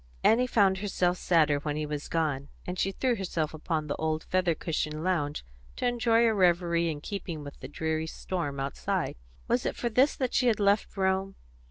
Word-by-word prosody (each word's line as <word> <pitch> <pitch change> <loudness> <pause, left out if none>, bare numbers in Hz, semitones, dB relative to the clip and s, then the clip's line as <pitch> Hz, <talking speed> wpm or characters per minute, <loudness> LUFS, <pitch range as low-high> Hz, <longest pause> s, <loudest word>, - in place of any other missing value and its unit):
Annie 245 +3 +4
found 195 -5 +3
herself 185 -3 0
sadder 155 -4 +3
when 145 0 -3
he 155 0 -2
was 150 0 -4
gone, 145 -4 -1 0.2
and 180 +1 -4
she 195 - +1
threw 250 +4 0
herself 165 -5 -2
upon 155 0 -2
the 145 - -2
old 160 0 -1
feather 180 -3 +1
cushioned 155 -1 -2
lounge 150 - -1 0.3
to - - -3
enjoy 235 -1 +3
a 225 - +4
reverie 170 -3 +3
in 150 -2 -4
keeping 170 -5 -5
with 145 -1 -10
the - - -7
dreary 160 +1 -2
storm 160 -5 -4
outside. 135 0 -2 0.3
Was 240 +1 +1
it - - -2
for 240 - -1
this 255 +6 +3
that 255 -2 -2
she 250 - +3
had 225 -3 +3
left 205 +1 +2
Rome? 190 0 0
175 Hz, 195 wpm, -29 LUFS, 155-200 Hz, 0.3 s, Annie